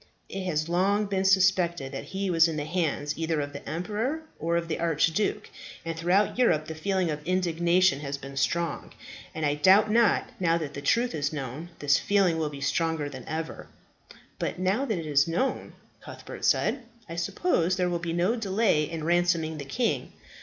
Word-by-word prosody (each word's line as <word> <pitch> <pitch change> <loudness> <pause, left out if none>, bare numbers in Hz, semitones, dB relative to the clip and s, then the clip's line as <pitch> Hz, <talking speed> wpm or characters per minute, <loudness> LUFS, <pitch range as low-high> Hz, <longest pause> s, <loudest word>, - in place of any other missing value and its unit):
It 195 -1 -5
has 155 -3 -1
long 195 +5 +2
been 195 -1 -1
suspected 185 -6 +3
that 135 - -6
he 195 0 -3
was 165 -1 +5
in 165 - -3
the 145 - -2
hands 155 -3 -1
either 160 -1 0
of 145 0 -4
the 140 - -8
emperor, 220 - -2 0.2
or 170 +1 0
of 170 0 -2
the 160 - -3
archduke, 165 +4 +1 0.4
and 165 0 -3
throughout 180 +8 +1
Europe 155 -11 +3
the 160 - -6
feeling 185 +1 0
of 150 0 -4
indignation 175 -1 +2
has 140 -1 -4
been 140 0 -10
strong; 170 +5 -1 0.4
and 160 - -1
I 145 - +2
doubt 190 +8 +5
not, 230 -1 +3
now 170 -2 +2
that 155 -4 -5
the 140 - -6
truth 235 +11 +1
is 145 -2 -1
known, 145 +3 -6
this 140 -1 +3
feeling 190 -5 +2
will 155 -2 -1
be 140 -1 -9
stronger 160 +1 0
than 130 -3 -9
ever." 160 0 -5 0.7
"But, - - -2
now 190 +9 +1
that 220 -8 -1
it 165 - -5
is 145 -1 +3
known," 180 +11 -1 0.3
Cuthbert - - -8
said, 270 - +2 0.3
"I 165 - -7
suppose 185 - 0
there 180 -1 +1
will 175 -1 -1
be 170 0 -3
no 175 +7 +1
delay 200 -8 +1
in 165 -2 -5
ransoming 170 -2 +1
the 140 - -6
king." 235 - -1
170 Hz, 190 wpm, -27 LUFS, 155-190 Hz, 0.7 s, was